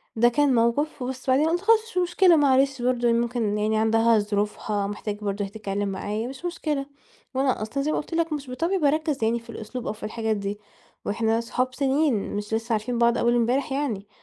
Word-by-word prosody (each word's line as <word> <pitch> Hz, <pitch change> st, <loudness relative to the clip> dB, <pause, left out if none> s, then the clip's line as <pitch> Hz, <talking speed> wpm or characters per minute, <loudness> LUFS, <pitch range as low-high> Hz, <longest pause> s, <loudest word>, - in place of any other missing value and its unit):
ده 240 Hz, +2 st, +5 dB
كان 280 Hz, +1 st, +2 dB
موقف. 240 Hz, +6 st, +1 dB
وبس 260 Hz, +1 st, -5 dB
بعدين 285 Hz, +5 st, +4 dB
قُلت 345 Hz, +1 st, 0 dB
خلاص 445 Hz, +2 st, +5 dB
مش 370 Hz, -, -8 dB
مشكلة 360 Hz, 0 st, +4 dB
معلش 270 Hz, -3 st, +3 dB
برضه 245 Hz, -1 st, +1 dB
هي 235 Hz, -, +4 dB
ممكن 235 Hz, -3 st, 0 dB
يعني 215 Hz, +1 st, +1 dB
عندها 225 Hz, +1 st, +4 dB
ظروفها 205 Hz, 0 st, -1 dB
محتاجة 205 Hz, 0 st, -4 dB
برضه 205 Hz, 0 st, -2 dB
هي 195 Hz, -, -7 dB
تتكلّم 205 Hz, -1 st, -3 dB
معايا 210 Hz, +4 st, -3 dB
مش 270 Hz, +6 st, -9 dB
مشكلة، 305 Hz, -5 st, -2 dB, 0.5 s
وأنا 265 Hz, -4 st, +1 dB
أصلًا 230 Hz, +6 st, -2 dB
زي 305 Hz, -, 0 dB
ما -, -, 0 dB
قُلت 305 Hz, -, -5 dB
لك 330 Hz, -1 st, 0 dB
مش 275 Hz, -3 st, -5 dB
بطبعي 335 Hz, +9 st, 0 dB
باركّز 305 Hz, -4 st, +1 dB
يعني 230 Hz, +2 st, +2 dB
في 235 Hz, 0 st, -20 dB
الأسلوب 230 Hz, +2 st, -6 dB
أو -, -, -1 dB
في 215 Hz, -, -14 dB
الحاجات 220 Hz, +1 st, -1 dB
دي 200 Hz, +1 st, -4 dB, 0.5 s
وإحنا 225 Hz, +2 st, +1 dB
أصحاب 255 Hz, +2 st, -2 dB
سِنين 275 Hz, -6 st, +1 dB
مش 205 Hz, +1 st, -4 dB
لسّه 225 Hz, +1 st, -1 dB
عارفين 225 Hz, +3 st, -1 dB
بعض 235 Hz, 0 st, +3 dB
أول 240 Hz, 0 st, +2 dB
امبارح 245 Hz, +4 st, +1 dB
يعني. 255 Hz, -8 st, -2 dB
240 Hz, 205 wpm, -25 LUFS, 215-280 Hz, 0.5 s, ده